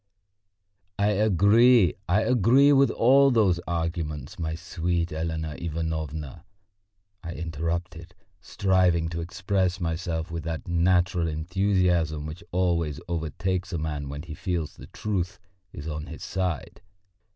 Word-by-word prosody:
"I 100 +1 +2
agree, 105 +2 +5 0.2
I 100 +5 +4
agree 125 +5 +5
with 135 0 +5
all 135 +4 +5
those 105 -8 +3
arguments, 80 -5 -3
my 80 -1 -2
sweet 85 0 -2
Elena 80 -1 -3
Ivanovna," 80 -2 -4 0.8
I 85 -2 -6
interrupted, 85 +2 -4 0.2
striving 90 -4 +1
to 85 0 -4
express 90 +1 -1
myself 80 -1 -3
with 85 -1 -4
that 80 -1 -4
natural 90 0 +2
enthusiasm 85 -1 0
which 80 +3 -8
always 85 -4 0
overtakes 90 +3 -2
a - - 0
man 75 -3 -3
when 75 +2 -6
he 85 -2 -8
feels 85 -2 -3
the - - -12
truth 95 -5 -3 0.3
is 80 0 -8
on 75 -1 -5
his - - -9
side. 90 -2 -3
85 Hz, 125 wpm, -26 LUFS, 80-95 Hz, 0.8 s, agree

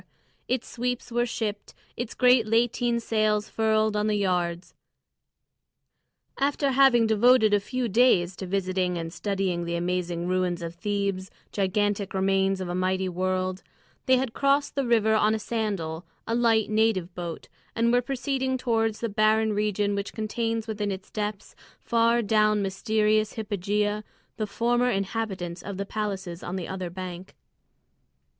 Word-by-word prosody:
Its 255 -1 -1
sweeps 245 0 -3
were 240 +1 +1
shipped, 215 -3 -4 0.2
its 240 -1 -5
great 250 -3 +4
lateen 235 +1 +1
sails 215 -2 +1
furled 220 -1 +1
on 210 0 +1
the 215 - +1
yards. 180 -3 -1 1.7
After 280 0 +1
having 260 -3 +5
devoted 220 0 +4
a 205 - +5
few 250 +4 -3
days 195 -5 +3
to 190 - -6
visiting 185 -1 -1
and 165 0 -5
studying 190 -2 -1
the 170 0 -3
amazing 175 0 -2
ruins 180 -1 0
of 165 0 -5
Thebes, 200 0 -2 0.2
gigantic 200 0 0
remains 195 0 +2
of 185 - -4
a 175 - -3
mighty 185 +1 0
world, 185 +1 -1 0.5
they 260 0 +5
had 250 -3 -2
crossed 280 +1 +2
the 275 -3 -1
river 220 -2 +3
on 215 0 +3
a - - 0
sandal, 200 -8 -3 0.2
a 230 - -2
light 230 -2 +3
native 215 -5 +1
boat, 170 -2 -6 0.3
and 235 +1 +2
were 245 - +4
proceeding 265 0 -1
towards 225 -3 0
the 230 - 0
barren 215 +1 +2
region 205 -1 0
which 200 0 -3
contains 225 +1 -2
within 210 -2 -2
its 190 0 -7
depths, 210 -1 -4 0.3
far 230 0 +2
down 215 -1 +3
mysterious 215 +2 +1
hypogea, 210 0 -1 0.3
the 215 - -2
former 240 +4 +1
inhabitants 195 -5 -3
of 200 -2 -6
the 200 - -3
palaces 195 -4 -4
on 175 - -5
the 185 -3 -4
other 185 -2 -4
bank. 185 +1 -8
210 Hz, 150 wpm, -26 LUFS, 185-230 Hz, 1.7 s, having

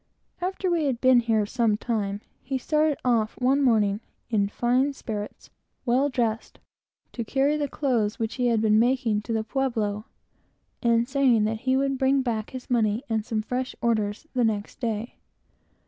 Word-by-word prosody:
After 370 0 -1
we 330 -3 +1
had 260 -4 0
been 255 -1 +5
here 225 -3 +1
some 225 -1 +1
time, 210 -3 -2 0.2
he 265 +1 -2
started 305 +2 +1
off 225 -3 +1
one 265 +3 +3
morning, 215 -5 +2 0.3
in 205 -3 +2
fine 250 +6 +1
spirits, 210 -6 -7 0.3
well 260 +4 +2
dressed, 230 -4 -2 0.6
to 235 - -3
carry 275 +6 +1
the 295 -1 -1
clothes 235 -8 0
which 225 -1 -2
he 245 - +3
had 230 -2 +2
been 215 -1 +4
making 240 -3 +2
to 230 - -7
the 220 -1 0
pueblo, 220 -4 -1 0.8
and 235 -1 +2
saying 260 -5 +3
he 225 +5 0
would 275 -1 0
bring 270 0 +3
back 220 -4 -2
his 255 -1 -8
money 225 -1 +1
and 220 -1 0
some 215 0 -2
fresh 255 +3 -3
orders 220 +1 0
the 250 -2 +1
next 215 0 -2
day. 230 -2 -3
235 Hz, 165 wpm, -25 LUFS, 215-265 Hz, 0.8 s, been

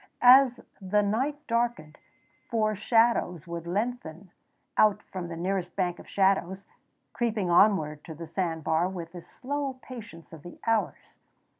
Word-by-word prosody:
As 255 0 +7 0.2
the 205 +2 +1
night 265 +9 -1
darkened 230 -10 -2 0.5
four 215 -3 +1
shadows 215 -6 +2
would 170 -1 -6
lengthen 195 -3 -4 0.4
out 215 -2 +3
from 185 -2 -6
the 170 - -6
nearest 180 0 -2
bank 180 -2 -1
of - - -13
shadows, 190 -1 +1 0.5
creeping 215 -6 -1
onward 160 -6 +3
to 160 - -8
the 165 +2 -8
sand 165 -1 -3
bar 165 +4 +1
with 170 -3 -7
the 175 0 -9
slow 275 +7 -4
patience 215 -11 -11
of 160 - -10
the 175 +3 -12
hours. 225 -1 -1
190 Hz, 145 wpm, -27 LUFS, 170-230 Hz, 0.5 s, As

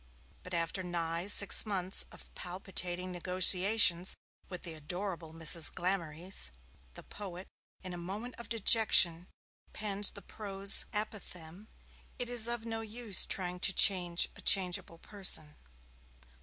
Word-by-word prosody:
But 180 -1 -8
after 170 +3 -3
nigh 170 0 -5
six 200 -1 +3
months 190 -3 -2
of - - -15
palpitating 180 0 -4
negotiations 185 +1 +3 0.3
with 180 - -9
the 170 - -8
adorable 170 +1 -7
Mrs. 165 0 +5
Glamorys, 175 - -3 0.5
the - - -12
poet, 190 -3 -10 0.4
in 185 -1 -8
a - - -7
moment 210 +8 -7
of 235 - -11
dejection, 190 -6 +3 0.5
penned 205 -1 -2
the 200 - -10
prose 195 -1 +5
apophthegm, 205 -3 -6 0.5
'It 245 - -4
is 240 -2 +2
of 235 -1 -4
no 225 -1 -5
use 220 -3 -3
trying 180 -1 -2
to 195 - +2
change 180 -3 +4
a - - -13
changeable 180 -3 +1
person.' 165 -6 -2
185 Hz, 130 wpm, -31 LUFS, 175-205 Hz, 0.5 s, Mrs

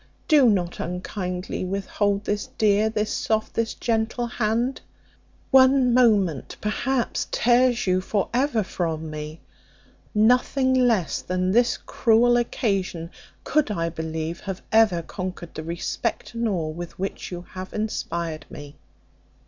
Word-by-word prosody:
Do 290 -6 +6
not 180 -4 0
unkindly 180 +1 -4
withhold 200 +2 -1
this 205 0 -2
dear, 215 0 +3
this 215 -1 -1
soft, 220 -1 -1
this 230 -1 -1
gentle 230 +1 -1
hand 235 +2 -1 0.7
one 260 -1 +6
moment, 205 - +2
perhaps, 240 +4 -1
tears 245 +1 +3
you 185 -1 +2
for 200 +1 -1
ever 250 -3 +1
from 160 -4 -3
me 155 +1 -7 0.7
nothing 250 +4 +3
less 235 - +2
than 185 0 -1
this 240 +4 +3
cruel 235 +1 +3
occasion 195 -8 -1 0.3
could, 305 -5 +1
I 165 -5 -1
believe, 160 0 -4
have 195 -2 -6
ever 215 -7 +4
conquered 180 -2 -6
the - - -5
respect 170 +9 -3
and 230 -1 -1
awe 170 -6 -1
with 170 +2 -7
which 195 +1 -4
you 175 -1 -6
have 185 0 -7
inspired 170 -7 -3
me." 145 -1 -10
205 Hz, 130 wpm, -24 LUFS, 175-235 Hz, 0.7 s, Do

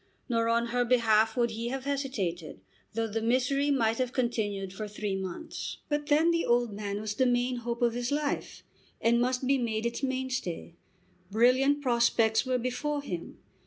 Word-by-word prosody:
Nor 230 -2 +1
on 235 0 +1
her 245 0 +3
behalf 225 -2 +3
would 235 -1 +2
he 230 +2 -4
have 265 +2 -4
hesitated, 230 - -3 0.4
though 225 0 +1
the 225 0 -3
misery 260 +5 +1
might 230 -5 +2
have 250 -1 -1
continued 205 -6 -1
for 215 +2 -5
three 205 -1 -3
months. 190 - -5
But 295 0 -1
then 310 +4 +4
the 335 0 +1
old 240 -2 +2
man 200 0 -4
was 215 0 -3
the 255 +4 +2
main 245 +1 +1
hope 240 0 -3
of 235 -1 +3
his 245 +2 -2
life, 290 0 -2 0.4
and 235 +1 +3
must 250 +1 0
be 270 +1 +3
made 225 -2 -1
its 235 +2 -2
mainstay. 260 -11 -3 0.6
Brilliant 255 +7 +3
prospects 235 -1 +3
were 255 -1 +2
before 280 +4 -2
him. 175 -10 -6
240 Hz, 175 wpm, -29 LUFS, 220-260 Hz, 0.6 s, then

